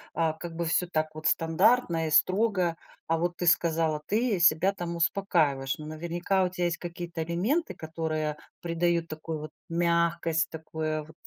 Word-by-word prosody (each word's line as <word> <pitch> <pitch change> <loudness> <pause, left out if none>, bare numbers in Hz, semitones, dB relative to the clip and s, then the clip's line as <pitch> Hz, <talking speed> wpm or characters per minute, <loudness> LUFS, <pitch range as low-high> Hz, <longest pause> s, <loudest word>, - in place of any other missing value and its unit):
а, 165 -1 +1
как 165 +1 -8
бы 170 0 -2
всё 175 +2 +1
так 155 -2 0
вот 155 0 -3
стандартно 165 +1 +3
и - - -3
строго, 185 0 +3 0.3
а 165 0 +1
вот 175 0 -1
ты 175 - -2
сказала, 160 -2 +2
ты 215 -2 +1
себя 170 +4 +4
там 175 -2 -4
успокаиваешь, 160 -7 +1
но 150 - -8
наверняка 170 +4 -1
у 180 - +1
тя 180 0 -3
есть 170 -1 0
какие-то 170 -1 -5
элементы, 210 - 0
которые 155 -1 -3 0.3
придают 170 0 +1
такую 155 0 -5
вот 155 - -7 0.2
мягкость, 170 -1 +1
такое 155 -1 -3
вот 160 +1 -16
165 Hz, 165 wpm, -28 LUFS, 160-175 Hz, 0.3 s, себя